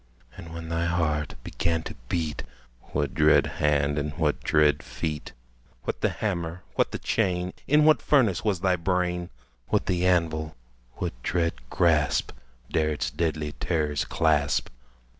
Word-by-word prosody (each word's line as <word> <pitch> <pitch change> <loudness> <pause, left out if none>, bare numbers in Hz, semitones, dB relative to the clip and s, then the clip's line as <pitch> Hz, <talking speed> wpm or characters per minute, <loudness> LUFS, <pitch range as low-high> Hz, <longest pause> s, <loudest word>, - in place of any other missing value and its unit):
And, 80 - -10
when 80 0 -7
thy 85 +1 0
heart 80 -3 0
began 80 -1 -1
to - - -6 0.2
beat, 80 -4 -1 0.5
What 75 -1 -1
dread 75 -1 +5 0.2
hand 75 0 +2
and 75 0 -3
what 75 -3 0
dread 75 -2 +3
feet? 75 -2 -5 0.5
What - - -3
the - - +3
hammer? 90 -4 -3
what - - +2
the - - -3
chain? 90 -4 0
In 150 +2 +5
what 155 0 +5
furnace 115 - +3
was 100 -5 0
thy 90 -1 +2
brain? 90 0 -1 0.4
What - - +1
the 90 -1 +1
anvil? 80 -3 +1 0.4
what - - -3
dread 85 +3 0 0.2
grasp 80 -4 +2 0.4
Dare 80 -1 +2
its 75 - -2
deadly 80 -3 -1
terrors 75 -2 -1
clasp? 75 -3 +1
80 Hz, 145 wpm, -26 LUFS, 75-90 Hz, 0.5 s, dread